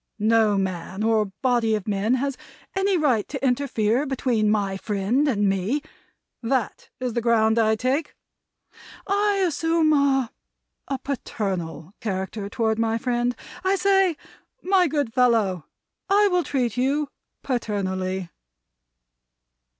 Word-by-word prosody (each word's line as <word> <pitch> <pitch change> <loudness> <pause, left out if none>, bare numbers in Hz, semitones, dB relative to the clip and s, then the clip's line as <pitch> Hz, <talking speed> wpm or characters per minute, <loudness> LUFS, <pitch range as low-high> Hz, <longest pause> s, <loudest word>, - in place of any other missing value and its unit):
No 220 -1 +3
man 190 +1 -3
or 220 -1 +3 0.2
body 240 -4 +2
of 210 -1 -5
men 210 +4 +1
has 275 +1 -1 0.4
any 385 0 +2
right 255 -10 +1
to 275 -2 -4
interfere 250 -1 +1
between 240 -5 +1
my 200 -2 +1
friend 210 +8 0
and 205 -6 +2
me. 195 +10 0 0.6
That 240 -1 -2
is 250 -2 -2
the 235 - 0
ground 225 -1 +3
I 220 -1 +3
take. 260 +7 -1 0.9
I 410 +1 +2
assume 325 0 +2
a 270 -4 +2 0.6
a 275 - -2
paternal 190 - -4
character 200 0 -4
toward 225 -2 0
my 225 0 +1
friend. 245 +1 0 0.3
I 380 +1 +2
say, 385 -3 +3 0.5
'My 370 -1 +3
good 285 -6 -1
fellow, 225 - +2 0.4
I 405 +1 +5
will 360 -1 +2
treat 250 -7 -1
you 275 +3 +1 0.3
paternally.'" 190 -7 -2
235 Hz, 125 wpm, -24 LUFS, 210-280 Hz, 0.9 s, I